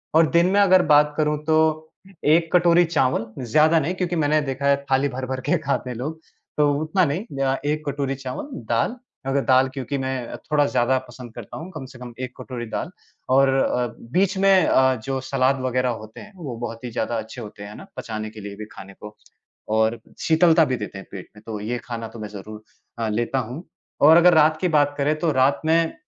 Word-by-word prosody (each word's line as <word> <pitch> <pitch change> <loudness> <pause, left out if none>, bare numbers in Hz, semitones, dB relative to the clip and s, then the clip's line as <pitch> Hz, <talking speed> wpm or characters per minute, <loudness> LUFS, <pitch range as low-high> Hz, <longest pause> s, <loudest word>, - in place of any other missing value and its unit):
और 160 -1 +5
दिन 170 +1 +4
में - - +5
अगर 185 -2 +6
बात 150 0 +5
करूँ 150 -1 +1
तो 155 -1 +3 0.7
1 165 +2 +3
कटोरी 175 0 +5
चावल, 130 -8 +1 0.2
ज़्यादा 155 +7 +4
नहीं 160 +5 -1
क्योंकि 180 -1 -2
मैंने 155 -1 +2
देखा 140 0 -4
है, 140 - +5 0.2
थाली 135 +2 +3
भर-भर 130 0 -4
के 175 - +1
खाते 140 -3 -2
हैं 125 - -5
लोग, 155 +6 -5 0.4
तो 145 -1 +4
उतना 180 +4 +1
नहीं, 145 +4 -1 0.5
1 155 0 -2
कटोरी 140 -1 -2
चावल, 130 - -6 0.2
दाल। 120 - +1 0.3
अगर 140 0 +1
दाल 130 -1 +4
क्योंकि 135 0 -4
मैं 130 -2 -4 0.2
थोड़ा 145 -1 +4
ज़्यादा 130 0 +1
पसंद 120 -3 -11
करता 120 -4 -9
हूँ 165 +4 -8
कम 150 -6 -7
से 130 -1 -14
कम 120 -1 -9
1 130 -1 -5
कटोरी 120 -2 -6
दाल 165 - -3 0.4
और 135 +1 +5
अ, 125 -2 +1 0.2
बीच 190 +2 +1
में 195 -2 +5
अ, 130 0 +4
जो 135 -1 -2
सलाद 130 0 +1
वग़ैरह 125 0 0
होते 110 0 -12
हैं 210 -1 -13
वो 145 -9 -6
बहुत 115 0 -6
ही 120 - -5
ज़्यादा 115 +1 -2
अच्छे 110 +3 -7
होते, 105 -1 -9
हैं 105 +1 -9
ना? - - -11
पचाने 110 -1 -5
के 110 -1 -11
लिए 100 0 -7
भी 105 +1 -8
खाने 95 0 -11
को 105 0 -10 0.6
और 110 +1 +2 0.2
शीतलता 160 0 +4
भी 130 - -1
देते 105 -2 -7
हैं 95 - -10
पेट 95 -2 -9
में, 105 - -14
तो 110 -2 -5
ये 120 +4 -3
खाना 115 -2 -5
तो 115 +1 -12
मैं 105 -1 -6
ज़रूर 105 +1 -10 0.4
अ, 110 -1 -1
लेता 120 +5 -1
हूँ 125 +8 -6 0.4
और 160 +3 +8
अगर 175 +1 +6
रात 155 0 +4
की 180 - +2
बात 145 0 +2
करें 150 +2 +1
तो 165 -1 +1
रात 130 0 +2
में 165 +1 +2
135 Hz, 215 wpm, -23 LUFS, 120-155 Hz, 0.7 s, और